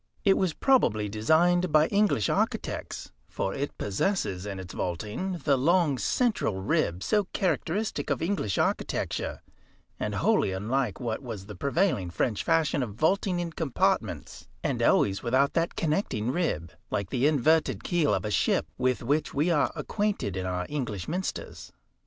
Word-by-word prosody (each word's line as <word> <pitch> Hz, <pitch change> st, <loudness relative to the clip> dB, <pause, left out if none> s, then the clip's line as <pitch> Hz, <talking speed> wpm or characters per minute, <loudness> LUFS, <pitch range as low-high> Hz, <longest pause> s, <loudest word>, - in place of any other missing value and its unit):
It 195 Hz, -1 st, +6 dB
was 185 Hz, -4 st, +1 dB
probably 110 Hz, -, +3 dB
designed 165 Hz, -, +3 dB
by 155 Hz, 0 st, +5 dB
English 200 Hz, -, +2 dB
architects, -, -, -2 dB, 0.2 s
for 95 Hz, -, -2 dB
it 140 Hz, +1 st, -4 dB
possesses, 100 Hz, -, -1 dB
in 100 Hz, -2 st, -5 dB
its 95 Hz, -1 st, -8 dB
vaulting, 105 Hz, -, -3 dB
the 140 Hz, -, +4 dB
long 160 Hz, -2 st, +3 dB
central 215 Hz, -, 0 dB
rib 95 Hz, -, 0 dB
so 210 Hz, -2 st, +2 dB
characteristic 195 Hz, +2 st, -1 dB
of -, -, 0 dB
English 165 Hz, -, -1 dB
architecture, -, -, -1 dB, 0.6 s
and -, -, -2 dB
wholly 95 Hz, -, +2 dB
unlike 110 Hz, +4 st, -1 dB
what 115 Hz, -1 st, -3 dB
was 110 Hz, -7 st, -7 dB
the 105 Hz, -, -8 dB
prevailing 140 Hz, -, 0 dB
French 105 Hz, +5 st, -1 dB
fashion 165 Hz, -3 st, +2 dB
of 110 Hz, -5 st, -4 dB
vaulting 180 Hz, -, +1 dB
in 170 Hz, -1 st, -3 dB
compartments, 155 Hz, -5 st, -1 dB, 0.2 s
and -, -, -1 dB
always 100 Hz, 0 st, +3 dB
without 130 Hz, +4 st, +2 dB
that 165 Hz, 0 st, 0 dB
connecting 150 Hz, -, 0 dB
rib, 105 Hz, -, -1 dB, 0.2 s
like 100 Hz, -2 st, -2 dB
the 130 Hz, +2 st, +2 dB
inverted 155 Hz, +2 st, +2 dB
keel 170 Hz, -4 st, +1 dB
of -, -, 0 dB
a 105 Hz, -, -2 dB
ship, 100 Hz, -, +2 dB
with 125 Hz, -1 st, +1 dB
which 145 Hz, +6 st, 0 dB
we 155 Hz, +5 st, +2 dB
are 150 Hz, -3 st, +2 dB
acquainted 205 Hz, -, -2 dB
in 95 Hz, 0 st, -2 dB
our 90 Hz, 0 st, -2 dB
English 120 Hz, -11 st, -3 dB
minsters. 185 Hz, +4 st, -4 dB
140 Hz, 155 wpm, -27 LUFS, 105-175 Hz, 0.6 s, It